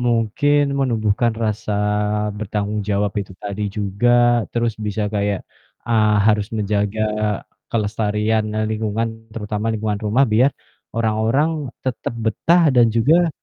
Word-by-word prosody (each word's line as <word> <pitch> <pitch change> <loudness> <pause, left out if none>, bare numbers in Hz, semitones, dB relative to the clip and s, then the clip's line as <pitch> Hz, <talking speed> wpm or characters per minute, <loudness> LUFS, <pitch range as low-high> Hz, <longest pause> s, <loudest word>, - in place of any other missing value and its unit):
mungkin 120 +5 +2 0.2
menumbuhkan 115 -3 +1
rasa 110 -2 -2 0.6
bertanggung 105 0 -2
jawab 100 0 0
itu 95 -1 -8
tadi 105 +1 -4
juga, 120 +4 +2
terus 120 -1 +1
bisa 105 0 -1
kayak, 100 -1 0 0.5
eee, 110 -2 +3
harus 105 -1 +2
menjaga 105 +1 0 0.7
kelestarian, 105 0 0
e - - 0
lingkungan, 110 +1 -1 0.3
terutama 105 0 -3
lingkungan 105 -1 -2
rumah, 110 +6 +3
biar 120 +3 +4 0.5
orang-orang 115 +7 +1 0.3
tetap 125 -2 -3
betah 115 +10 +2
dan 120 -2 +5
juga 160 +9 +4
110 Hz, 115 wpm, -20 LUFS, 105-120 Hz, 0.7 s, dan